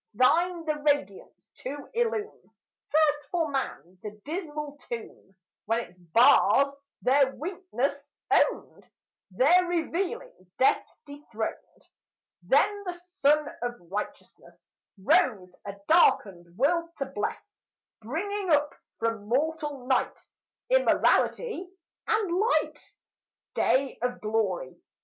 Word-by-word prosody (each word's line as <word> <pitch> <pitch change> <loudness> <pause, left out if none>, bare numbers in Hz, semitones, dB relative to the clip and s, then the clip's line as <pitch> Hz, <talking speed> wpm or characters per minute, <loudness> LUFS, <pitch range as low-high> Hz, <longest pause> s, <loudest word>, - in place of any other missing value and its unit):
Thine 335 - +2
the 305 -1 -1
radiance 290 -10 -2
to 280 +2 -7
illume 450 -2 -2 0.4
First, 295 -1 +2
for 330 -4 -1
man, 185 - -4
the 210 0 -8
dismal 300 -3 -5
tomb, 225 -4 -8 0.3
When 225 +2 +1
its 205 - -12
bars 245 - +4 0.3
their 265 0 +3
weakness 290 -5 -3 0.2
owned, - - +1 0.4
There 285 - +4
revealing 350 - -3
death 260 - +3 0.2
dethroned. 285 -7 -7 0.5
Then 410 -1 +2
the 360 - -3
Sun 325 -4 +1
of 245 0 -2 0.2
righteousness 210 +1 -7 0.3
Rose, 210 - +2
a 200 -1 -6
darkened 185 - +3
world 335 +6 +1
to 275 - -2
bless, 265 -6 -6 0.4
Bringing 380 - -3
up 295 -2 +3 0.2
from 225 -2 -2
mortal 290 +1 -1
night, 260 0 0 0.5
Immortality - - +2 0.4
and 400 -5 +1
light. 445 +4 0 0.6
Day 270 +1 +1
of 245 0 -2
glory! 210 -10 -2
285 Hz, 105 wpm, -27 LUFS, 230-345 Hz, 0.6 s, bars